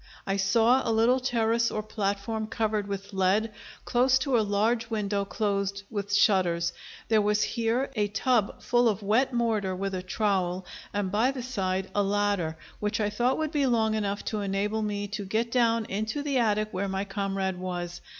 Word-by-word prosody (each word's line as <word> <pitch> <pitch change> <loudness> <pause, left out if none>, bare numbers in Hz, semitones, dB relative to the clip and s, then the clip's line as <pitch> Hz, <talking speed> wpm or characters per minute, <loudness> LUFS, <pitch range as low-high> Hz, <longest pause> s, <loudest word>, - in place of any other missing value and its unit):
I 195 - 0
saw 225 +6 +4
a - - -2
little 230 +4 +3
terrace 230 -2 +1
or 215 - -3
platform 215 +1 -2
covered 215 -2 -1
with 200 0 -6
lead, 195 +4 +1 0.3
close 255 +1 +3
to 260 0 0
a 230 - +4
large 220 +3 +1
window 205 -2 -1
closed 200 -1 -1
with 200 -2 -3
shutters. 185 -4 +3 0.3
There 220 -1 +4
was 210 0 +2
here 235 +4 0
a 210 -2 +1
tub 215 +1 0
full 240 -1 +3
of 210 -1 -2
wet 225 +7 +2
mortar 220 -6 0
with 195 +1 -3
a 185 - -2
trowel, 185 -2 -1 0.3
and 205 -2 -2
by 220 +5 +3
the 265 -2 -4
side 190 -6 -2
a 205 - +2
ladder, 200 -5 0 0.2
which 210 +1 -1
I 210 -1 0
thought 245 +5 +1
would 315 -1 -1
be 290 -4 +1
long 220 -3 +2
enough 205 -2 -2
to 215 -2 -2
enable 200 +2 -1
me 205 -1 -2
to 205 0 -4
get 220 +4 -1
down 230 -2 +2
into 215 +9 -3
the 280 -3 +1
attic 215 -2 +1
where 195 +2 -2
my 195 +1 -2
comrade 195 -2 -2
was. 175 -1 -4
210 Hz, 185 wpm, -27 LUFS, 195-230 Hz, 0.3 s, saw